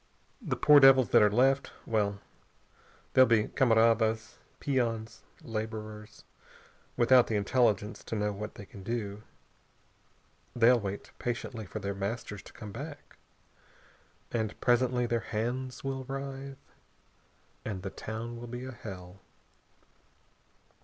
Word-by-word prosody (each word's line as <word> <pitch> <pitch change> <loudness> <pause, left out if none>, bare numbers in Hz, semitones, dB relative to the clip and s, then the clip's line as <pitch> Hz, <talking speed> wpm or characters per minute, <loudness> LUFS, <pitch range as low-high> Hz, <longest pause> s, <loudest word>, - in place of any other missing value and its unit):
The 155 - -2
poor 150 +3 +7
devils 135 -4 +7
that - - +6
are 105 - +6
left 135 +5 +2
well 100 -3 0 0.9
they'll 130 0 +7
be 110 -2 +3
camaradas, 115 -2 +2 0.2
peons, 115 -5 -1 0.2
laborers, 110 -1 -6 0.7
without 125 +1 +6
the 110 - -1
intelligence 105 -1 +1
to - - -4
know 105 0 0
what 105 +2 -6
they 100 - -9
can 100 - -12
do. 105 -1 -4 1.3
They'll 120 +1 +5
wait 100 -1 -6
patiently 115 -2 -4
for - - -6
their 100 -1 -3
masters 100 +1 -4
to - - -14
come 105 -3 -9
back. 145 +6 -9 1.1
And 110 -3 -2
presently 125 0 +2
their 120 0 0
hands 120 +4 -3
will 135 -1 -3
writhe.... 135 0 -6 1.1
And 95 -4 -5
the 95 - -4
town 115 +2 -6
will 120 +1 -8
be 120 +2 -6
a 130 - -6
hell." 95 -5 -9
115 Hz, 125 wpm, -30 LUFS, 105-125 Hz, 1.3 s, poor